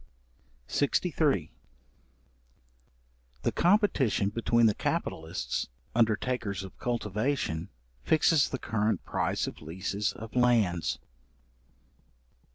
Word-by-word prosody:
§63. 145 - +1 1.9
The - - +2
competition 170 - +3
between 115 +2 +2
the 110 - +5
capitalists, 80 -1 -2 0.3
undertakers 110 -3 0
of 95 - -10
cultivation, 105 - -1 0.3
fixes 155 - +4
the 135 - -3
current 110 -5 -1
price - - 0
of - - -7
leases 95 +6 -2
of 115 +2 -10
lands. 100 - +2
110 Hz, 80 wpm, -29 LUFS, 95-125 Hz, 1.9 s, the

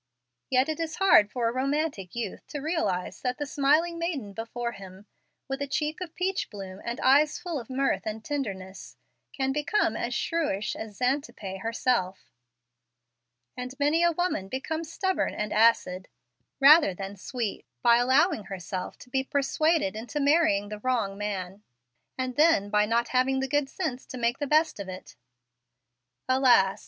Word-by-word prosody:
Yet 260 0 +3
it 315 0 -3
is 320 -1 -3
hard 375 - +5
for 235 0 -1
a - - +1
romantic 275 - -2
youth 230 -5 -5
to 295 - -5
realize 305 - -2
that 250 -1 -2
the 290 - -3
smiling 305 +5 +2
maiden 285 - -3
before 235 +2 -4
him, 195 -1 -12 0.4
with 270 +1 -4
a 280 - -1
cheek 300 +4 -2
of 340 -3 -6
peach 375 +1 -1
bloom 195 -2 -8
and 235 +1 -4
eyes 290 +3 +4
full 345 -5 -4
of 235 - -10
mirth 265 -7 0
and 215 0 -5
tenderness, 195 -10 -5 0.3
can 265 -1 -1
become 300 +9 +1
as - - -2
shrewish 295 - -1
as 215 -2 -8
Xantippe 250 -7 -2
herself. 225 -3 -1 1.2
And 250 +2 -7
many 295 +4 +3
a 345 - +5
woman 340 - -1
becomes 315 +6 -4
stubborn 375 -4 -1
and 210 0 -3
acid, 210 -5 +3 0.5
rather 280 - +7
than 195 +2 -6
sweet, 225 +2 -4 0.2
by 235 -1 +6
allowing 260 - +3
herself 185 -1 -5
to - - -13
be 265 0 +1
persuaded 295 +2 +1
into 240 +7 -4
marrying 285 -9 +3
the 210 0 -6
wrong 225 -5 -1
man, 200 -1 -4 0.6
and 255 0 -3
then 295 -11 +4
by 210 0 +3
not 235 +1 +1
having 260 +1 +2
the 265 - -1
good 290 0 0
sense 265 -8 -4
to 255 - -7
make 235 +1 0
the 290 - -2
best 310 -3 +2
of 195 -1 -6
it. 185 0 -9 1.1
Alas! 250 -7 +4
255 Hz, 165 wpm, -27 LUFS, 210-295 Hz, 1.2 s, rather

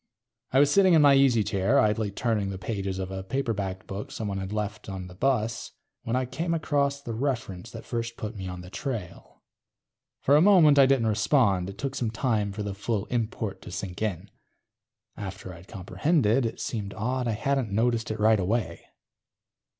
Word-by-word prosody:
I 130 - +2
was 145 +1 +5
sitting 190 -1 +5
in 155 - +6
my 140 -1 +7
easy 135 -5 +4
chair, 105 +5 +1
idly 105 -2 +2
turning 105 -1 -1
the 95 - -5
pages 95 0 -3
of 95 0 -4
a 95 0 -4
paperbacked 100 -5 -3
book 100 +2 -6
someone 100 -3 -3
had 95 0 -5
left 105 -1 -4
on 95 -1 -5
the 90 - -11
bus, 115 +1 -1 0.3
when 115 - -2
I 130 0 +1
came 165 +7 -2
across 140 -3 0
the 120 -5 -6
reference 115 -6 -3
that - - -9
first 115 -1 -4
put 110 +1 -5
me 95 -2 -6
on 90 -1 -6
the 90 +1 -11
trail. 110 -11 -6 0.8
For 140 - +4
a 150 - +6
moment 170 -7 +6
I 135 - +7
didn't 135 -4 +3
respond. 105 -4 +2
It 100 - -9
took 135 -1 -3
some 120 -4 -1
time 110 -3 0
for 105 +2 -5
the 100 -1 -3
full 100 +1 -2
import 110 -3 -2
to - - -10
sink 90 0 -6
in. 105 -6 -3 0.8
After 95 -2 -7
I'd 85 +2 -13
comprehended, 115 - +1
it - - -7
seemed 100 -4 -4
odd 125 +4 -1
I 115 - +1
hadn't 135 +1 0
noticed 115 +2 +1
it 110 0 -3
right 110 0 +4
away. 95 -2 -1
110 Hz, 190 wpm, -27 LUFS, 100-130 Hz, 0.8 s, my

